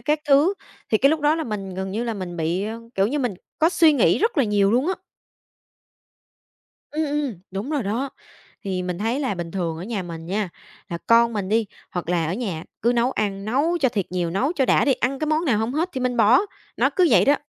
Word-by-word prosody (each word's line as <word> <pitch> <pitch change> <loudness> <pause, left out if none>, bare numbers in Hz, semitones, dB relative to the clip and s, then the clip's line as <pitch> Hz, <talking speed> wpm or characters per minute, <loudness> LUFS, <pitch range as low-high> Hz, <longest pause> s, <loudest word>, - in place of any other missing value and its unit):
các 300 0 0
thứ, 290 +8 +5 0.4
thì 215 - +4
cái 275 +4 +5
lúc 315 0 0
đó 295 +1 +3
là 325 - -2
mình 195 -5 -5
gần 190 0 -4
như 225 +4 -2
là 230 -2 -2
mình 180 -3 -6
bị, 170 +4 -1
ờ, 225 +2 -5
kiểu 195 +1 +3
như 290 +6 -1
mình 245 -7 -1 0.2
có 320 +1 +5
suy 335 -3 +5
nghĩ 215 - +3
rất 445 -4 +1
là 275 - +4
nhiều 205 -2 +2
luôn 255 +5 +2
á. 380 - +1 2.0
Ừm, 310 +1 -1
ừm, 290 - -2
đúng 195 +8 -4
rồi 295 -4 0
đó. 230 +7 -2 0.5
Thì 185 -2 -2
mình 180 -1 -3
thấy 230 +5 0
là 260 -7 -1
bình 170 -2 -5
thường 170 -4 -2
ở 170 - -6
nhà 205 -2 -3
mình 165 -1 -8
nha, 195 +1 -2 0.4
là 170 - -3
con 235 0 +5
mình 200 -3 -3
đi, 225 0 +2 0.3
hoặc 175 -1 -4
là 170 -2 +1
ở 170 - -1
nhà 190 -8 -3 0.2
cứ 235 - +3
nấu 240 +2 +2
ăn, 200 -4 -2
nấu 290 +10 +1
cho 260 - +4
thiệt 205 -6 -1
nhiều, 175 -2 -1
nấu 250 - 0
cho 270 -7 +1
đã - - +3
đi, 275 - +4
ăn 265 +3 -1
cái 310 - -1
món 310 +2 +1
nào 245 -8 +2
hông 225 +3 -1
hết 330 +5 0
thì 260 - -3
mình 250 -1 -1
bỏ, 230 +3 +6 0.4
nó - - +3
cứ 365 -3 +5
vậy - - +5
đó. 285 - +5
230 Hz, 245 wpm, -23 LUFS, 190-280 Hz, 2.0 s, bỏ